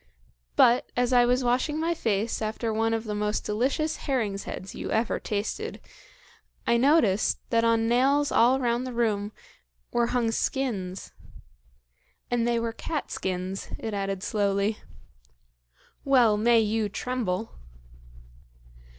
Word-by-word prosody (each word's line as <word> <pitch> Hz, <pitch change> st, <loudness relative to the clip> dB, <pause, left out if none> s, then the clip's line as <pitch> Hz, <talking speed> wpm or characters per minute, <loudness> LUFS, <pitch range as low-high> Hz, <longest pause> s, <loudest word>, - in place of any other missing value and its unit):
But, 240 Hz, +2 st, +4 dB
as 245 Hz, +1 st, +1 dB
I 245 Hz, -1 st, +5 dB
was 250 Hz, +1 st, +2 dB
washing 255 Hz, +5 st, +1 dB
my 330 Hz, +2 st, +1 dB
face 225 Hz, -7 st, -1 dB
after 220 Hz, +1 st, -2 dB
one 225 Hz, +1 st, +1 dB
of 225 Hz, -1 st, -1 dB
the 215 Hz, -2 st, -4 dB
most 210 Hz, 0 st, -1 dB
delicious 270 Hz, +9 st, 0 dB
herring's 220 Hz, -8 st, -2 dB
heads 190 Hz, -, -7 dB
you -, -, -6 dB
ever 220 Hz, +1 st, 0 dB
tasted, 220 Hz, -, -3 dB, 0.9 s
I 235 Hz, -, +3 dB
noticed 235 Hz, -6 st, +3 dB
that 230 Hz, -1 st, +3 dB
on 230 Hz, 0 st, +2 dB
nails 275 Hz, +4 st, +3 dB
all 250 Hz, +3 st, +4 dB
round 245 Hz, 0 st, 0 dB
the 255 Hz, -, -6 dB
room 215 Hz, -3 st, 0 dB, 0.6 s
were 235 Hz, -1 st, +2 dB
hung 235 Hz, -2 st, 0 dB
skins 205 Hz, -8 st, -2 dB, 1.2 s
and 240 Hz, -1 st, +1 dB
they 235 Hz, -1 st, +1 dB
were 230 Hz, 0 st, -2 dB
cat 305 Hz, +6 st, -4 dB
skins," 185 Hz, +1 st, -3 dB
it 220 Hz, -, -5 dB
added 195 Hz, -1 st, -3 dB
slowly. 200 Hz, 0 st, 0 dB, 1.2 s
"Well 250 Hz, -6 st, +4 dB
may 230 Hz, +2 st, +4 dB
you 215 Hz, 0 st, 0 dB
tremble!" 225 Hz, -2 st, -3 dB
230 Hz, 135 wpm, -26 LUFS, 210-250 Hz, 1.2 s, I